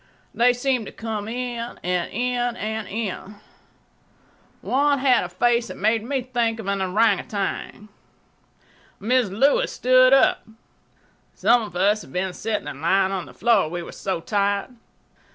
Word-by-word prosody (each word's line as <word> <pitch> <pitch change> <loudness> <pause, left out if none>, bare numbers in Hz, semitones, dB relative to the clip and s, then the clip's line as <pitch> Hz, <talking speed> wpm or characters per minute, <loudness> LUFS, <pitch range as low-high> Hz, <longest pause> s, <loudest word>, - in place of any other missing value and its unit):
They 245 +1 +4
seemed 245 -2 -1
to - - -8
come 220 -2 -5
in—and 235 -7 -3
in—and 240 -3 -2
in. 205 -1 -5 1.3
One 285 +2 +2
had 260 -2 +3
a 180 - -5
face 235 +6 +1
that - - -8
made 220 +2 +1
me 265 +1 -2
think 235 -3 -1
of 220 - -7
an 200 0 -1
ourang 200 +2 +2
outang. 205 -1 -4 1.1
Mrs. 240 +1 +1
Lewis 275 +4 +3
stood 255 +1 +4
up. 270 - +4 0.9
Some 240 0 +3
of 210 -5 -8
us 205 +4 +2
had 130 - -13
been 180 +2 -2
sitting 220 +3 -3
and 140 - -7
lying 190 +3 +2
on 190 -3 -4
the - - -13
floor, 215 -6 +2
we 175 +1 -5
were - - -9
so 190 -3 -3
tired. 200 +5 -1
220 Hz, 150 wpm, -23 LUFS, 195-245 Hz, 1.3 s, They